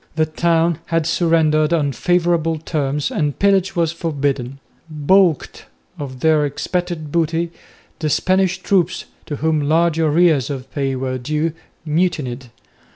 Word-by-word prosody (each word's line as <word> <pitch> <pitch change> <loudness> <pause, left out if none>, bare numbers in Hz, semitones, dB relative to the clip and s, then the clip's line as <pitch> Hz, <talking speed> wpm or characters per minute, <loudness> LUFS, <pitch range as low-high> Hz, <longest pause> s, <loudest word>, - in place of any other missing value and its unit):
The 160 0 +2
town 165 +1 +1
had 165 -2 0
surrendered 160 -2 +2
on 150 -4 +1
favourable 170 +1 +1
terms 150 -2 -2
and 145 -2 -1
pillage 195 -2 +2
was 165 -2 +1
forbidden. 140 -6 -2 0.3
Baulked 160 +1 +1 0.3
of 130 -3 -7
their 155 -2 +3
expected 155 +2 -3
booty, 165 +1 0 0.5
the 155 - -1
Spanish 185 +3 +1
troops, 185 -2 +1 0.2
to 150 - -3
whom 155 +1 0
large 165 +2 +2
arrears 155 -4 +3
of 135 -2 -6
pay 135 -2 -1
were 130 0 -3
due, 150 +5 -1 0.3
mutinied. 150 -6 -1
155 Hz, 130 wpm, -19 LUFS, 145-170 Hz, 0.5 s, their